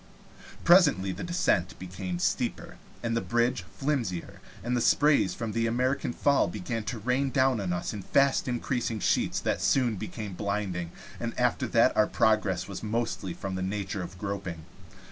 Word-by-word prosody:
Presently 145 - +5
the 95 - -6
descent 130 - 0
became 90 0 -5
steeper - - -2 0.3
and 115 -1 0
the 115 - +1
bridge 120 -2 +1
flimsier, 125 - -2 0.2
and 120 +1 0
sprays 150 +4 +3
from 115 -2 -4
the 115 +1 0
American 125 +3 0
Fall 140 +3 +2
began 105 +5 -4
to 125 - -3
rain 125 +5 0
down 130 -2 +2
on 95 -3 -2
us 90 +4 -2
in 105 - -5
fast 140 +7 +2
increasing 120 -2 -1
sheets - - +1
that - - -1
soon 120 -6 +2
became 105 0 -6
blinding, 95 -4 -2 0.3
and - - -4
after - - +1
that - - +4
our 105 - +4
progress 105 -5 +1
was 100 - -6
mostly 110 -5 -2
in 95 -1 -2
the 95 - -3
nature 95 0 -3
of 90 +1 -7
groping. 95 -4 -5
110 Hz, 165 wpm, -28 LUFS, 95-125 Hz, 0.3 s, Presently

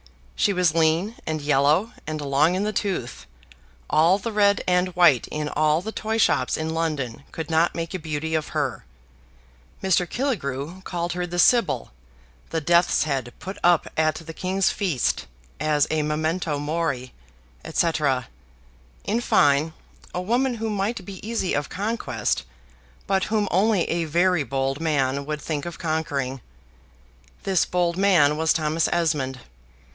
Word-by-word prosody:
She - - +2
was 180 -4 +2
lean, 165 +7 +2
and 155 -1 -1
yellow, 150 - +2
and 155 0 -3
long 145 +4 +2
in 190 - 0
the 215 0 -1
tooth; 125 - -3 0.6
all 165 +5 +4
the 215 +3 -4
red 205 -1 +3
and 180 0 +3
white 170 -9 +5
in 150 0 -3
all 155 +3 +2
the 220 - -4
toy 220 0 -2
shops 130 - +2
in 160 0 -2
London 150 -7 -2
could 160 0 -6
not 160 +2 +2
make 165 0 -4
a 185 - -3
beauty 160 0 -3
of 155 -1 0
her 145 -5 -2 1.0
Mr. 180 -2 +2
Killigrew 175 - -3
called 175 -2 -3
her 180 0 -3
the 175 0 -5
Sybil, 235 +6 +3 0.6
the 165 - -1
death's 170 +3 +3
head 135 -5 -2
put 190 +2 -7
up 175 -2 +4
at 155 0 +2
the 165 0 -8
King's 190 +2 0
feast 175 - -1 0.3
as 150 -2 +2
a 155 -1 +1
memento 155 +1 -1
mori, 145 -4 -2 0.6
&c. 170 +1 +2 1.1
in 225 +3 0
fine, 145 -5 +3 0.4
a - - 0
woman 245 +6 +1
who 225 -1 -3
might 200 0 -2
be 195 -2 -9
easy 225 -6 -1
of 145 0 -1
conquest, 210 +5 -2 0.6
but 195 -1 +1
whom 215 -2 0
only 200 +1 +3
a 170 -1 -1
very 175 +2 +2
bold 135 0 -2
man 140 -3 0
would 150 -1 -3
think 150 -1 -3
of 170 - -7
conquering. 145 -5 -2 1.0
This 190 -3 +2
bold 175 -1 0
man 175 -7 +4
was 160 +1 +2
Thomas 155 0 +1
Esmond. 145 -7 0
165 Hz, 150 wpm, -24 LUFS, 150-185 Hz, 1.1 s, white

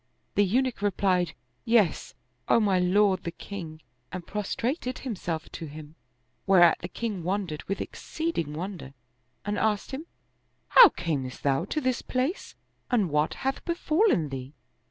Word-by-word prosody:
The 205 - +4
Eunuch 245 +4 +1
replied, 185 -4 +1 0.3
"Yes, 225 -8 +2 0.3
O - - +5
my 200 -4 +3
lord 190 +1 +3
the - - -2
king," 165 -3 -8 0.3
and 185 -2 -6
prostrated 245 - -2
himself 175 -10 -4
to 165 - -6
him; 150 +1 -10 0.5
whereat 180 -3 +6
the 175 - -5
king 205 0 -4
wondered 180 -3 -2
with 195 - -3
exceeding 315 - -3
wonder 165 -4 -6 0.5
and 205 0 -1
asked 215 +1 0
him, 290 +5 -6 0.6
"How 485 -5 +10
camest 135 -7 -4
thou 140 +4 +1
to 305 - -2
this 255 -4 0
place 260 +9 -2 0.3
and 210 - +2
what 150 +2 +1
hath 270 - -1
befallen 335 - +2
thee? 135 +1 -6
195 Hz, 140 wpm, -27 LUFS, 165-235 Hz, 0.6 s, How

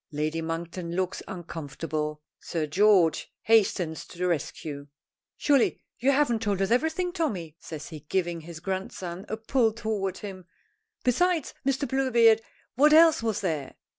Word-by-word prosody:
Lady 155 +2 -1
Monkton 170 +1 -4
looks 185 0 -1
uncomfortable. 150 -3 -5 0.2
Sir 165 -3 -2
George 180 +1 +3
hastens 190 -7 +2
to - - -13
the 180 - -1
rescue. 150 -3 -3 0.5
"Surely 280 -5 +3 0.2
you 260 - +2
haven't 270 -5 +2
told 205 -3 0
us 195 +2 0
everything, 320 +8 +1
Tommy?" 190 - -2
says 155 -2 -8
he 155 -3 -8
giving 170 +2 -2
his 165 0 -9
grandson 185 0 -5
a 220 - -2
pull 225 +1 +2
toward 215 -4 -2
him. 190 -3 -8 0.6
"Besides 330 +5 +1
Mr. 275 +1 0
Bluebeard, 235 -4 +4 0.3
what 300 +4 +5
else 325 -2 +7
was 220 -3 -1
there?" 155 -8 -2
190 Hz, 140 wpm, -27 LUFS, 165-235 Hz, 0.6 s, else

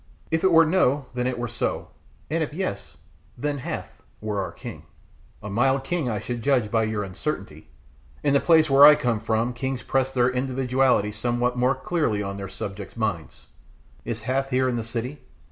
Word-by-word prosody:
If 160 0 +1
it 190 - +4
were 165 0 +7
no 150 -5 +2
then 125 0 -1
it 130 -1 -2
were 120 0 -2
so, 120 - -3 0.4
and 165 +1 +1
if 150 -1 -3
yes 100 - -4 0.4
then 145 +2 -2
Hath - - -6 0.2
were 105 -2 -2
our 95 - -4
king." - - -10 0.6
"A 105 - -5
mild 130 +5 +2
king 160 -3 -1
I 110 - -1
should 120 +3 -4
judge 125 -5 +1
by 115 -1 +2
your 110 -1 -2
uncertainty. 95 - -5 0.6
In 145 -2 +2
the 140 - +5
place 160 -1 +5
where 140 0 +6
I 150 +1 +11
came 120 -6 0
from 115 +3 0
kings 130 +1 -3
press 135 0 0
their 125 -1 +2
individualities 125 -4 +1
somewhat 120 +2 0
more 125 +2 +2
clearly 145 -12 -1
on 100 0 -4
their 100 -1 -6
subjects' 100 +2 -7
minds. 105 -8 -3 0.6
Is 115 -1 -4
Hath 135 +4 -1
here 130 0 +2
in 125 - 0
the 115 - -2
city? 120 +5 -4
125 Hz, 190 wpm, -24 LUFS, 110-135 Hz, 0.6 s, I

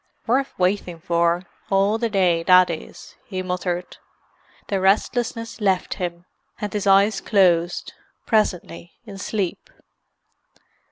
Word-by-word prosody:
"Worf 265 +4 0
waiting 180 -2 0
for, 170 +1 +1 0.3
all 200 +3 +2
the 230 -1 0
day, 180 -5 +2
that 180 +1 +5
is!" 160 - -9
he 185 -2 -4
muttered. 180 -1 -3 0.7
The 195 -2 -1
restlessness 230 +4 0
left 190 -3 +1
him, 175 0 -4 0.3
and 210 0 -4
his 205 -1 -2
eyes 195 +2 +4
closed, 175 -4 +2 0.3
presently, 180 -6 -1
in 200 -3 -9
sleep. 195 -2 -3
190 Hz, 115 wpm, -22 LUFS, 175-210 Hz, 0.7 s, that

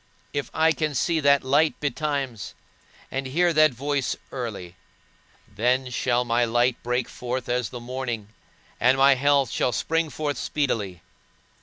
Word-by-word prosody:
If 145 -1 -2
I 160 +1 +3
can 155 -2 -2
see 165 +4 +1
that 140 -1 +4
light 145 +4 +2
betimes, 140 - -3 0.6
and 135 0 -3
hear 170 +6 +2
that 155 0 +6
voice 140 +1 -2 0.2
early, 105 -9 -6 0.7
Then 125 +5 0
shall 125 0 +1
my 120 0 +2
light 120 +1 +1
break 125 +1 -1
forth 125 0 -4
as 125 -3 -1
the 120 - -7
morning, 120 -3 -4 0.5
and 130 +2 +4
my 135 +1 +6
health 140 -1 +2
shall 125 - +1
spring 165 +7 0
forth 145 0 -3
speedily. 105 - -2
130 Hz, 145 wpm, -25 LUFS, 120-145 Hz, 0.7 s, that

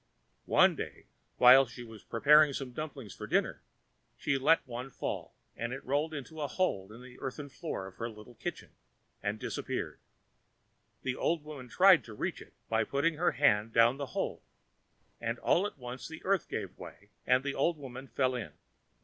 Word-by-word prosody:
One - - +5
day, - - -7 0.3
while 130 +2 +8
she 120 +1 -9
was 110 -3 -12
preparing 150 +4 +5
some 135 -2 -4
dumplings 140 -6 -6
for - - -8
dinner, - - +1 0.6
she 140 - 0
let 140 +5 +4
one 125 +2 -5
fall, - - -5 0.2
and 120 +1 -3
it 135 +1 -7
rolled 145 +4 0
into 155 +1 -7
a 145 - 0
hole 115 - -1
in 115 +3 -11
the 125 0 -13
earthen 140 +2 -5
floor 140 - -5
of 95 - -11
her 115 0 -3
little 110 +2 -12
kitchen - - -6 0.5
and 105 +1 -2
disappeared. - - -4 1.0
The 130 -1 -1
old 160 +1 0
woman 145 -5 -9
tried 185 +4 +6
to 110 - -10
reach - - -3
it - - -14
by 110 0 +2
putting 145 +7 0
her 175 +2 +2
hand 110 -6 +3
down 115 +3 +5
the 140 -1 -4
hole, - - -2 0.8
and - - -2
all 190 +4 +2
at - - -11
once 125 0 -7
the 160 0 -10
earth 195 -2 +1
gave - - -5
way, 100 +4 -11 0.2
and 125 +1 +4
the 140 -1 -2
old 165 +5 +1
woman 135 -1 -8
fell 130 -1 +1
in. 120 -4 -5
130 Hz, 185 wpm, -31 LUFS, 120-150 Hz, 1.0 s, while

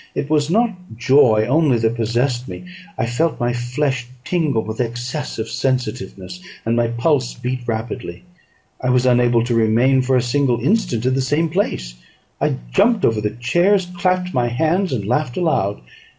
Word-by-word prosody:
It 145 - -3
was 150 -1 +2
not 230 +5 +2 0.3
joy 120 -4 +4
only 145 -2 +3
that 110 0 +1
possessed 120 +2 -1
me; - - -8 0.3
I - - 0
felt 125 +8 -1
my 120 -1 0
flesh 125 +1 -2 0.2
tingle 155 -10 0
with 110 +2 -4
excess 120 +5 -4
of 110 0 -3
sensitiveness, 120 - -3 0.2
and 115 +1 +1
my 120 0 +2
pulse 125 +2 0
beat 125 +1 -3
rapidly. 115 +5 -4 0.6
I 125 - 0
was 125 0 +3
unable 120 -2 +3
to 120 0 -1
remain 115 +4 +3
for 130 +1 +1
a - - +3
single 125 -1 +1
instant 130 - 0
in 130 - +2
the 135 - +1
same 150 +5 0
place; 155 - -2 0.5
I - - +1 0.2
jumped 230 -4 +3
over 110 -2 +1
the 105 0 -2
chairs, 175 +10 +2
clapped 180 +1 0
my 125 -2 +1
hands, 160 +10 0
and 110 -7 -2
laughed 125 +3 -1
aloud. 105 - 0
125 Hz, 170 wpm, -19 LUFS, 115-150 Hz, 0.6 s, joy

